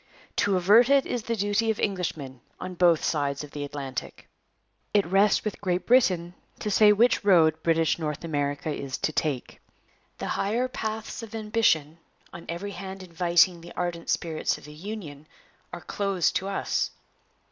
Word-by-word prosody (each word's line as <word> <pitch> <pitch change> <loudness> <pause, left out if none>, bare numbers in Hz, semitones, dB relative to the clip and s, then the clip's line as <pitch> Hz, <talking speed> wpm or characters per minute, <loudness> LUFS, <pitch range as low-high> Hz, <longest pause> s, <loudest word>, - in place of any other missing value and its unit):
To 200 -2 +2
avert 210 +8 +5
it 280 -1 +4
is 245 - -2
the 230 +1 -2
duty 205 +2 0
of 220 - 0
Englishmen, 155 - -3 0.2
on 185 0 -6
both 175 -2 +3
sides 145 -2 -1
of 145 - -10
the 145 - -5
Atlantic.' 140 -3 -6 0.7
It 205 - +4
rests 195 +5 +3
with 215 - -4
Great 180 -2 -1
Britain 185 -9 +3 0.2
to 210 - -3
say 210 +1 +6
which 230 +3 +3
road 160 -5 +4
British 165 0 +2
North 150 -1 -3
America 145 -1 -2
is 135 -2 -4
to - - -1
take. 145 -6 -2 0.6
'The - - -4
higher 230 +6 0
paths 220 -2 -5
of 225 -1 -9
ambition, 210 -8 +1 0.3
on 170 - -10
every 180 +5 -4
hand 190 -1 -7
inviting 175 0 +2
the 170 - -11
ardent 175 -1 -4
spirits 160 -2 -1
of - - -16
the 150 - -11
Union, 155 -4 -8 0.4
are - - -7
closed 195 -4 -1
to 190 - -4
us. 195 - -1
180 Hz, 165 wpm, -26 LUFS, 155-205 Hz, 0.7 s, say